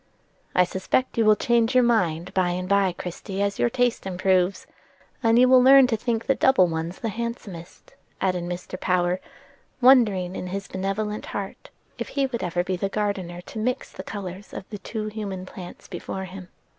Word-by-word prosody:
"I 180 - +6
suspect 190 +8 -1
you 225 - +4
will 215 0 +6
change 235 +2 +2
your 255 - +6
mind 185 -7 +1
by 185 -2 +2
and 180 +1 -3
by, 200 -1 +3
Christie, 180 +3 -6
as 200 0 0
your 240 - +3
taste 245 -4 0
improves, 185 0 +1 0.6
and 230 -1 +4
you 250 +1 +6
will 255 0 +7
learn 270 +1 +8
to 245 -3 +1
think 230 0 -2
the 270 - +3
double 265 -7 +4
ones 165 +1 -3
the 230 - -1
handsomest," 215 -6 -7 0.3
added 180 -2 0
Mr. 180 +1 -6
Power, 180 0 +1 0.6
wondering 215 -8 +4
in 180 - -5
his 195 +2 -4
benevolent 200 +3 -3
heart 195 -1 -6 0.3
if - - -3
he 275 -1 0
would 245 -3 -3
ever 175 0 -1
be 185 0 -2
the 195 +2 -1
gardener 195 -4 -2
to 215 - -8
mix 250 +4 -2
the - - -8
colors 195 -1 -7
of 190 - -7
the 205 - -6
two 215 +1 -5
human 205 -3 -5
plants 180 -1 -10
before 190 +1 -5
him. 185 -1 -10
195 Hz, 185 wpm, -24 LUFS, 180-230 Hz, 0.6 s, learn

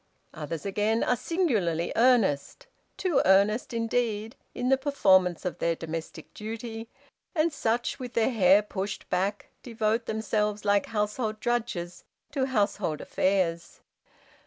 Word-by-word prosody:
"Others, 155 +2 -6
again, 210 +3 +1
are 250 - +2
singularly 225 - 0
earnest 225 - +2 0.3
too 360 -7 +2
earnest, 200 +6 +3
indeed 230 -1 -1 0.2
in 250 - -1
the 270 - +6
performance 190 - +2
of 180 - -3
their 170 0 +1
domestic 165 0 -7
duty; 225 +1 -6 0.5
and 315 0 +2
such, 235 -2 -1
with 250 -1 -7
their 230 +3 +2
hair 200 -2 +5
pushed 195 -1 -5
back, 195 +3 -1
devote 225 -1 -1
themselves 210 -1 -1
like 205 0 +2
household 215 +1 -2
drudges 220 -7 -2 0.3
to 270 -2 0
household 205 - 0
affairs. 180 -3 -1
215 Hz, 125 wpm, -27 LUFS, 190-240 Hz, 0.5 s, the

